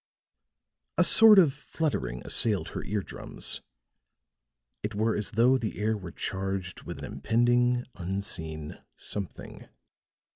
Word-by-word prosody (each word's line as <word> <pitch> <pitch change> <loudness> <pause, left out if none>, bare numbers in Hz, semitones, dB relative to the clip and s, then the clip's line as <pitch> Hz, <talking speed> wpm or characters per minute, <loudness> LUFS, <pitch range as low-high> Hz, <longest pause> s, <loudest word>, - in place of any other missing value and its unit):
A - - +6
sort 220 -1 +8
of 165 -8 +6
fluttering 145 - -3
assailed 105 -5 +1
her - - -5
ear 105 -1 -2
drums; - - -3 1.2
it 105 0 -4
were 110 +2 +1
as 105 - -1
though 125 +4 +4
the 110 -3 -4
air 110 +1 0
were 95 -5 -7
charged 95 -1 -4
with - - -7
an - - -3
impending, 120 - +2
unseen 85 -5 -4 0.2
something. 100 -3 -6
105 Hz, 120 wpm, -28 LUFS, 95-120 Hz, 1.2 s, sort